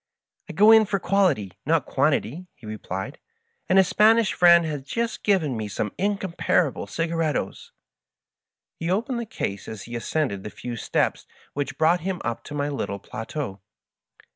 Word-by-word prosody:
"I -, -, -6 dB
go 210 Hz, +6 st, +6 dB
in 220 Hz, -1 st, +7 dB
for 200 Hz, 0 st, 0 dB
quality, 175 Hz, -, +1 dB
not -, -, +1 dB
quantity," 155 Hz, -, 0 dB
he 125 Hz, -, -16 dB
replied; 110 Hz, +4 st, -6 dB, 0.5 s
"and 185 Hz, -, +4 dB
a 190 Hz, -, +8 dB
Spanish 215 Hz, +3 st, +4 dB
friend 170 Hz, -1 st, +6 dB
has 150 Hz, -3 st, -3 dB
just 230 Hz, -, -3 dB
given 175 Hz, -, +1 dB
me 110 Hz, -1 st, -3 dB
some 105 Hz, +1 st, -3 dB
incom 195 Hz, -2 st, -1 dB
parable 140 Hz, -, +1 dB
dgarritos.^^ 165 Hz, +4 st, -2 dB, 1.1 s
He 165 Hz, -, -2 dB
opened 235 Hz, +7 st, 0 dB
the 235 Hz, -, -5 dB
case 100 Hz, -, -4 dB
as 110 Hz, -3 st, -7 dB
he 120 Hz, -, -8 dB
ascended 120 Hz, -5 st, -2 dB
the -, -, -5 dB
few 120 Hz, +3 st, -7 dB
steps 115 Hz, -, -1 dB, 0.3 s
which 145 Hz, 0 st, -3 dB
brought 165 Hz, +3 st, +3 dB
him 185 Hz, +1 st, -3 dB
up 115 Hz, 0 st, -3 dB
to 150 Hz, -, -7 dB
my 145 Hz, 0 st, -1 dB
little 135 Hz, -8 st, -3 dB
plateau. 110 Hz, +1 st, -6 dB
155 Hz, 165 wpm, -24 LUFS, 115-190 Hz, 1.1 s, a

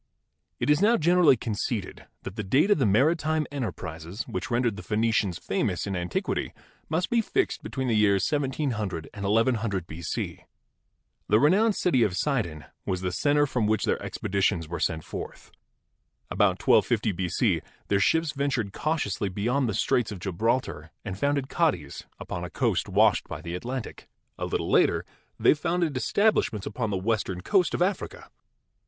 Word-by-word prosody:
It -, -, +2 dB
is 150 Hz, -, +3 dB
now 230 Hz, +3 st, +5 dB
generally 170 Hz, -4 st, +5 dB
conceded 105 Hz, -2 st, -4 dB, 0.2 s
that 95 Hz, -, -7 dB
the 110 Hz, -, -3 dB
date 135 Hz, -, +3 dB
of 205 Hz, -, +4 dB
the 130 Hz, -, +3 dB
mari^ 130 Hz, -, +4 dB
time 155 Hz, -1 st, -1 dB
enterprises 90 Hz, -, -5 dB
which 145 Hz, -, -5 dB
rendered 120 Hz, -3 st, +1 dB
the 105 Hz, -, -7 dB
Phenicians 110 Hz, -4 st, 0 dB
famous -, -, -1 dB
in 100 Hz, -1 st, -3 dB
antiquity 90 Hz, -1 st, -2 dB, 0.4 s
must 160 Hz, +3 st, -1 dB
be 235 Hz, -1 st, +4 dB
fixed 385 Hz, -, -1 dB
between 130 Hz, -1 st, -4 dB
the 120 Hz, -, +1 dB
years 100 Hz, -3 st, +3 dB
1700 130 Hz, -, -2 dB
and 100 Hz, -3 st, -5 dB
1100 110 Hz, -3 st, +1 dB
B.C. 80 Hz, 0 st, -5 dB, 0.9 s
The 105 Hz, -, +5 dB
renowned 200 Hz, -, +4 dB
city 150 Hz, -9 st, +2 dB
of 95 Hz, -5 st, +1 dB
Sidon 100 Hz, -, -1 dB, 0.2 s
was 90 Hz, -1 st, -2 dB
the 90 Hz, -1 st, -1 dB
center 145 Hz, -, +2 dB
from 125 Hz, -6 st, 0 dB
which 110 Hz, -1 st, +1 dB
their -, -, 0 dB
expeditions 95 Hz, -4 st, -1 dB
were 85 Hz, +1 st, -5 dB
sent 80 Hz, 0 st, -1 dB
forth. -, -, -8 dB, 0.8 s
About -, -, +2 dB
1250 110 Hz, -2 st, +3 dB
B.C. 90 Hz, -1 st, 0 dB, 0.3 s
their 100 Hz, -, +2 dB
ships 160 Hz, +9 st, +2 dB
ventured 135 Hz, -8 st, -1 dB
cautiously 145 Hz, -, -1 dB
beyond 120 Hz, +7 st, 0 dB
the 105 Hz, -, -2 dB
Straits 120 Hz, -3 st, +1 dB
of 100 Hz, -, -5 dB
Gibraltar 95 Hz, -2 st, -1 dB, 0.2 s
and 100 Hz, -2 st, -4 dB
founded 140 Hz, +5 st, 0 dB
Cadiz -, -, -1 dB
upon 90 Hz, -, -5 dB
a 90 Hz, -, -5 dB
coast -, -, 0 dB
washed -, -, +3 dB
by -, -, -6 dB
the 85 Hz, -, -6 dB
Atlantic. 120 Hz, +6 st, -6 dB, 0.3 s
A -, -, -2 dB
little -, -, -2 dB
later -, -, +3 dB, 0.3 s
they -, -, +6 dB
founded 165 Hz, -1 st, -1 dB
establishments 130 Hz, -, +1 dB
upon 115 Hz, +1 st, -3 dB
the 100 Hz, -, -1 dB
western 95 Hz, -2 st, -1 dB
coast 180 Hz, -, +2 dB
of -, -, +2 dB
Africa. 195 Hz, +2 st, -3 dB
115 Hz, 165 wpm, -26 LUFS, 95-145 Hz, 0.9 s, they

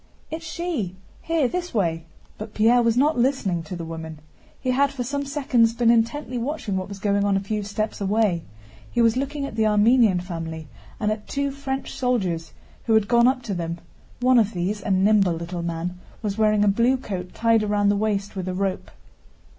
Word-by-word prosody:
"It's 320 Hz, 0 st, -5 dB
she. 310 Hz, -, -3 dB, 0.3 s
Here, 325 Hz, -5 st, +1 dB
this 355 Hz, +1 st, -4 dB
way!" 165 Hz, -5 st, 0 dB, 0.3 s
But 215 Hz, 0 st, -8 dB
Pierre 235 Hz, +3 st, +5 dB
was 230 Hz, 0 st, +2 dB
not 290 Hz, +1 st, +3 dB
listening 235 Hz, -9 st, +1 dB
to 165 Hz, +3 st, -7 dB
the 170 Hz, -1 st, -5 dB
woman. 160 Hz, -1 st, -7 dB, 0.4 s
He 255 Hz, -, -1 dB
had 275 Hz, +2 st, +3 dB
for 265 Hz, -3 st, -4 dB
some 280 Hz, +3 st, -3 dB
seconds 255 Hz, -5 st, +2 dB
been 235 Hz, -1 st, +4 dB
intently 245 Hz, +3 st, 0 dB
watching 245 Hz, -5 st, -3 dB
what 185 Hz, 0 st, -2 dB
was 200 Hz, -, -7 dB
going 200 Hz, 0 st, +1 dB
on 200 Hz, -1 st, +2 dB
a -, -, +1 dB
few 210 Hz, +2 st, -3 dB
steps 210 Hz, +1 st, -3 dB
away. 200 Hz, -3 st, +1 dB, 0.5 s
He -, -, -1 dB
was 230 Hz, -1 st, +4 dB
looking 280 Hz, +2 st, -2 dB
at 275 Hz, -, -7 dB
the 220 Hz, -1 st, +2 dB
Armenian 215 Hz, -2 st, +4 dB
family 165 Hz, -3 st, -6 dB, 0.3 s
and 210 Hz, -1 st, +1 dB
at 215 Hz, -1 st, -5 dB
two 280 Hz, 0 st, -1 dB
French 270 Hz, -1 st, -4 dB
soldiers 185 Hz, -11 st, -1 dB, 0.4 s
who 225 Hz, -, +4 dB
had 215 Hz, -2 st, +3 dB
gone 235 Hz, +1 st, +5 dB
up 255 Hz, -1 st, +1 dB
to 210 Hz, -, -3 dB
them. 170 Hz, -1 st, -3 dB, 0.4 s
One 255 Hz, 0 st, +5 dB
of 220 Hz, -1 st, +1 dB
these, 195 Hz, +4 st, -2 dB
a 205 Hz, -, -5 dB
nimble 195 Hz, -1 st, +4 dB
little 170 Hz, +1 st, -5 dB
man, 170 Hz, +1 st, -4 dB, 0.2 s
was 205 Hz, -2 st, -1 dB
wearing 215 Hz, -1 st, +3 dB
a -, -, +3 dB
blue 235 Hz, +6 st, +3 dB
coat 185 Hz, -7 st, -6 dB
tied 230 Hz, -1 st, +3 dB
round 205 Hz, -1 st, +2 dB
the -, -, +1 dB
waist 200 Hz, -1 st, -1 dB
with 185 Hz, -1 st, -4 dB
a 185 Hz, -, -2 dB
rope. 195 Hz, 0 st, -2 dB
215 Hz, 200 wpm, -24 LUFS, 190-250 Hz, 0.5 s, Pierre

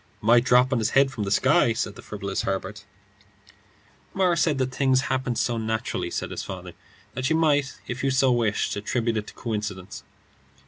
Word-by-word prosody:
"Might 120 Hz, +2 st, +4 dB
drop 125 Hz, +1 st, +4 dB
on 125 Hz, -, +1 dB
his 110 Hz, 0 st, +1 dB
head 135 Hz, 0 st, +5 dB
from 110 Hz, -6 st, -4 dB
the -, -, -2 dB
sky," 115 Hz, +3 st, +3 dB
said 110 Hz, -2 st, -3 dB
the -, -, -12 dB
frivolous 100 Hz, -1 st, -4 dB
Herbert. 95 Hz, 0 st, -4 dB, 1.3 s
"Morris 180 Hz, -3 st, +2 dB
said 150 Hz, -4 st, +2 dB
the 130 Hz, -, +1 dB
things 130 Hz, 0 st, +1 dB
happened 130 Hz, -3 st, -2 dB
so 120 Hz, -2 st, 0 dB
naturally," 110 Hz, +1 st, -2 dB
said -, -, -4 dB
his -, -, -4 dB
father, -, -, -8 dB, 0.4 s
"that 130 Hz, +3 st, -2 dB
you 160 Hz, -, +2 dB
might 145 Hz, -4 st, +1 dB
if 125 Hz, +2 st, -5 dB
you 135 Hz, -, +2 dB
so 130 Hz, 0 st, +3 dB
wished 115 Hz, -4 st, 0 dB
attribute 115 Hz, +2 st, -1 dB
it 105 Hz, -, -3 dB
to -, -, -10 dB
coincidence." 105 Hz, -5 st, -5 dB
120 Hz, 185 wpm, -25 LUFS, 110-135 Hz, 1.3 s, head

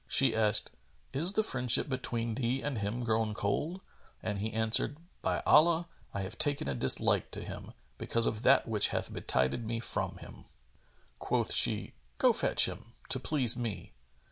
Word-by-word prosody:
She -, -, +3 dB
asked, 105 Hz, -1 st, +3 dB, 0.4 s
"Is 165 Hz, +8 st, +2 dB
the 220 Hz, -, +1 dB
friendship 125 Hz, -, +2 dB
between 120 Hz, -4 st, -3 dB
thee 125 Hz, +2 st, -2 dB
and 140 Hz, -6 st, -3 dB
him 105 Hz, +5 st, -3 dB
grown 110 Hz, -2 st, -1 dB
cold?" 150 Hz, -, -2 dB, 0.4 s
and 105 Hz, -2 st, -3 dB
he 110 Hz, +2 st, -3 dB
answered, 110 Hz, +6 st, +1 dB, 0.2 s
"By -, -, -1 dB
Allah, 170 Hz, +2 st, +4 dB, 0.2 s
I 100 Hz, -, -4 dB
have 95 Hz, +4 st, -7 dB
taken 145 Hz, -, +2 dB
a 70 Hz, -, -1 dB
dislike 60 Hz, -, +2 dB
to -, -, -6 dB
him, -, -, -9 dB, 0.3 s
because 115 Hz, 0 st, +1 dB
of 110 Hz, -1 st, -1 dB
that 130 Hz, +2 st, +4 dB
which 110 Hz, -2 st, +3 dB
hath -, -, -4 dB
betided 65 Hz, -, -1 dB
me 115 Hz, +1 st, -3 dB
from 120 Hz, -, -4 dB
him."[FN#428] -, -, -13 dB, 0.7 s
Quoth -, -, -1 dB
she, -, -, +2 dB, 0.2 s
"Go -, -, +4 dB
fetch -, -, +4 dB
him, 115 Hz, -, -8 dB, 0.2 s
to 130 Hz, -, +1 dB
please 130 Hz, -4 st, +1 dB
me." 115 Hz, -, -5 dB
115 Hz, 170 wpm, -31 LUFS, 110-135 Hz, 0.7 s, Allah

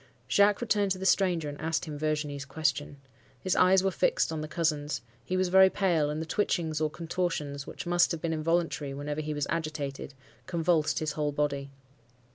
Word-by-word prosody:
"Jacques 200 Hz, -, +4 dB
returned 210 Hz, -4 st, +1 dB
to 190 Hz, -, 0 dB
the 190 Hz, -, -5 dB
stranger, 180 Hz, -5 st, +2 dB
and 145 Hz, 0 st, -7 dB
asked 160 Hz, +2 st, -1 dB
him 155 Hz, -2 st, -6 dB
Virginie's 150 Hz, -1 st, -2 dB
question. 145 Hz, 0 st, -2 dB, 0.4 s
His 185 Hz, +4 st, 0 dB
eyes 185 Hz, +1 st, +5 dB
were 195 Hz, -, +2 dB
fixed -, -, +1 dB
on 160 Hz, -1 st, -3 dB
the 155 Hz, -, -4 dB
cousins; 150 Hz, -5 st, -1 dB, 0.2 s
he 185 Hz, +8 st, -2 dB
was 185 Hz, -1 st, +1 dB
very 190 Hz, +1 st, +7 dB
pale, 170 Hz, -7 st, +1 dB
and 150 Hz, +1 st, -3 dB
the 160 Hz, -, -3 dB
twitchings 160 Hz, -3 st, -1 dB
or 155 Hz, -, +2 dB
contortions, 160 Hz, -4 st, -3 dB
which -, -, -7 dB
must 175 Hz, 0 st, +3 dB
have 165 Hz, -, -2 dB
been 165 Hz, +1 st, -2 dB
involuntary 160 Hz, -3 st, -1 dB
whenever 145 Hz, +2 st, -3 dB
he 150 Hz, 0 st, -4 dB
was 145 Hz, -1 st, -1 dB
agitated, 145 Hz, -4 st, -4 dB, 0.3 s
convulsed 170 Hz, -3 st, +1 dB
his 155 Hz, -1 st, -1 dB
whole 150 Hz, -1 st, -1 dB
body. 140 Hz, -1 st, -1 dB
155 Hz, 190 wpm, -29 LUFS, 150-180 Hz, 0.4 s, very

